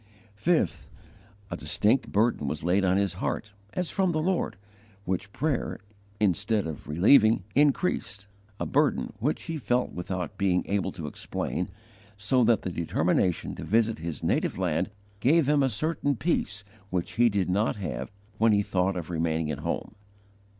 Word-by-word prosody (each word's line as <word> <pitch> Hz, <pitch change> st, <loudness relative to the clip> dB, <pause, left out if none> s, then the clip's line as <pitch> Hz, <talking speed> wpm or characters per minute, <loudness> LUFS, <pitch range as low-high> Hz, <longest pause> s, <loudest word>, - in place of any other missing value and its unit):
5. 105 Hz, -, +1 dB, 0.6 s
A -, -, -1 dB
distinct 120 Hz, +6 st, +1 dB
burden 105 Hz, -8 st, +2 dB
was 75 Hz, +2 st, -3 dB
laid 90 Hz, +4 st, +2 dB
on 95 Hz, 0 st, +3 dB
his 100 Hz, -3 st, +1 dB
heart, 105 Hz, -1 st, -2 dB, 0.2 s
as 180 Hz, -2 st, -1 dB
from 190 Hz, -2 st, +2 dB
the 155 Hz, -, +1 dB
Lord, 175 Hz, -, 0 dB, 0.5 s
which 95 Hz, +2 st, -2 dB
prayer, 145 Hz, +2 st, -1 dB, 0.4 s
instead 105 Hz, +1 st, +1 dB
of 80 Hz, -3 st, -6 dB
relieving, 105 Hz, -, +5 dB
increased 140 Hz, -, +1 dB, 0.3 s
a -, -, -1 dB
burden -, -, +1 dB
which 140 Hz, +8 st, -1 dB
he 165 Hz, -2 st, -4 dB
felt 125 Hz, -1 st, 0 dB
without 90 Hz, +2 st, -4 dB
being 95 Hz, -2 st, +2 dB
able 100 Hz, -1 st, -1 dB
to 85 Hz, -5 st, -6 dB
explain 75 Hz, -, -3 dB, 0.5 s
so 115 Hz, +5 st, +3 dB
that 115 Hz, -2 st, +3 dB
the 90 Hz, -, -2 dB
determination 85 Hz, +1 st, 0 dB
to -, -, -7 dB
visit 110 Hz, 0 st, +2 dB
his 80 Hz, -2 st, -5 dB
native -, -, 0 dB
land 90 Hz, -1 st, 0 dB, 0.3 s
gave 145 Hz, +5 st, +4 dB
him 145 Hz, -1 st, +4 dB
a 135 Hz, -, +3 dB
certain 145 Hz, +3 st, 0 dB
peace 105 Hz, -, -1 dB, 0.3 s
which 90 Hz, -3 st, -2 dB
he 120 Hz, 0 st, +4 dB
did 100 Hz, -3 st, 0 dB
not 100 Hz, +4 st, +1 dB
have 70 Hz, -, -4 dB, 0.3 s
when 110 Hz, 0 st, +5 dB
he 100 Hz, 0 st, +3 dB
thought 95 Hz, 0 st, 0 dB
of 85 Hz, 0 st, -5 dB
remaining 80 Hz, -1 st, 0 dB
at 75 Hz, -, -4 dB
home. 75 Hz, -, -3 dB
100 Hz, 160 wpm, -27 LUFS, 90-125 Hz, 0.6 s, relieving